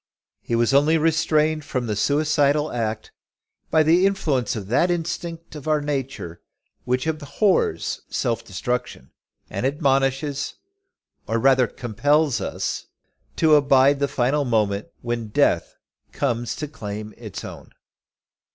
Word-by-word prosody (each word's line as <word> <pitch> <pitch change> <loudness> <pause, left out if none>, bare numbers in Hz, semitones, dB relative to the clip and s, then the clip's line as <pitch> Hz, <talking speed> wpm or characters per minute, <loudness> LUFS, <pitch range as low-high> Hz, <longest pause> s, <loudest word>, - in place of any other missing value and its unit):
He 115 - -2
was 120 +2 +2
only 150 +4 +4
restrained 155 -1 +2
from 130 -3 -3
the 105 -2 -2
suicidal 145 +3 +2
act, 110 -2 -3 0.6
by 160 - +4
the 170 +5 +4
influence 150 -12 0
of 105 -3 -5
that 125 - +2
instinct 170 -1 -4
of 150 0 -8
our 155 -1 +3
nature, 135 - -4 0.4
which 125 +1 0
abhors 155 - 0
self 115 -2 -1
destruction, 100 - -4 0.4
and - - -4
admonishes, 135 0 0 0.7
or 115 - 0
rather 130 +1 +4
compels 145 +5 +1
us, - - -3 0.5
to 160 -2 +4
abide 140 -1 +5
the 140 - +1
final 140 +1 +1
moment 105 -5 0 0.2
when 120 -1 -3
death 105 - +1 0.4
comes 120 -4 -1
to 150 - -4
claim 105 -6 -6
us - - -17
as - - -15
its - - -7
own. - - -10
140 Hz, 135 wpm, -23 LUFS, 120-155 Hz, 0.7 s, abide